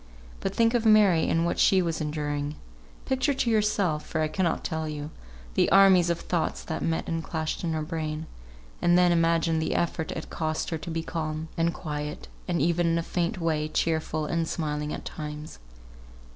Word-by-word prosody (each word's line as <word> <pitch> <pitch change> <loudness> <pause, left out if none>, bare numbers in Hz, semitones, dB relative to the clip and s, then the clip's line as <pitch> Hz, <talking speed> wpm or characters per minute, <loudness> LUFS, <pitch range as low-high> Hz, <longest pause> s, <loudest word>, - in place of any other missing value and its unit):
But - - -3
think 230 0 +3
of 240 -2 +2
Mary 210 -7 +5
and 165 +1 +2
what 170 - -1
she 190 - +5
was 170 -3 -1
enduring! 150 -1 -2 0.5
Picture 265 +2 +1
to 265 -3 0
yourself 205 -8 +1
(for 160 - -2
I 155 - +2
cannot 170 0 -1
tell 160 -1 -2
you) 150 0 -5 0.4
the - - +3
armies 190 -3 +6
of 170 -1 0
thoughts 175 -2 -1
that 160 - -4
met 165 -1 -1
and 165 -1 -2
clashed 160 0 -3
in 165 -2 -1
her 155 -1 -1
brain; 155 -1 -3 0.6
and 175 0 +4
then 180 -1 +5
imagine 165 -1 +2
the 160 - -1
effort 165 -2 -1
it 160 - -7
cost 155 0 -2
her 160 - -2
to 170 - -7
be 165 0 -2
calm, 155 -1 -4
and 165 0 +1
quiet, 150 -3 -5 0.2
and 175 -2 0
even, 170 +2 +2
in 165 0 +2
a 165 - -1
faint 175 +1 -1
way, 155 -2 0
cheerful 160 0 -1
and 165 +1 -1
smiling 150 -2 -2
at - - -6
times. 150 - -7
165 Hz, 190 wpm, -27 LUFS, 155-175 Hz, 0.6 s, armies